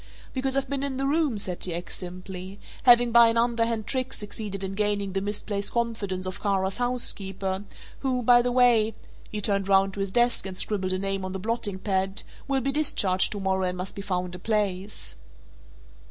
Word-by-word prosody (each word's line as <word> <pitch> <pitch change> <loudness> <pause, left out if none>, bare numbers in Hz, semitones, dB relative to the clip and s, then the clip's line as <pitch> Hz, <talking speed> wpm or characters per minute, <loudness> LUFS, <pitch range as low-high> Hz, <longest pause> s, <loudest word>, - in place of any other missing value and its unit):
"Because 265 0 -1
I've 275 - 0
been 280 -1 -1
in 275 -2 -2
the 270 - -1
room," 290 -4 +1
said 185 -3 -2
T. 175 -2 0
X. 175 +1 -5
simply, 185 +2 -7 0.3
"having 240 -1 +7
by 235 0 +8
an 230 0 +2
underhand 230 -2 +1
trick 260 +2 -1
succeeded 205 -2 -4
in 190 0 -3
gaining 205 -1 0
the 195 - 0
misplaced 205 0 -3
confidence 220 -6 -2
of 185 - -5
Kara's 195 0 0
housekeeper, 195 -6 -1 0.3
who 255 -2 -1
by 240 +1 +6
the 245 0 0
way" 235 -3 +4 0.3
he 210 - -4
turned 200 -1 0
round 195 0 +4
to 200 - -7
his 195 0 -1
desk 240 0 +2
and 185 -1 -7
scribbled 190 -3 0
a - - 0
name 195 0 -1
on 185 0 -4
the 190 - -4
blotting 210 -1 -1
pad 190 0 0 0.2
"will 270 -1 +1
be 275 +2 0
discharged 205 -11 +3
to 205 - -5
morrow 190 -1 0
and 180 0 -3
must 180 +1 -3
be 200 - -5
found 180 -2 -2
a 180 - -7
place." 205 -1 -2
205 Hz, 195 wpm, -26 LUFS, 190-240 Hz, 0.3 s, by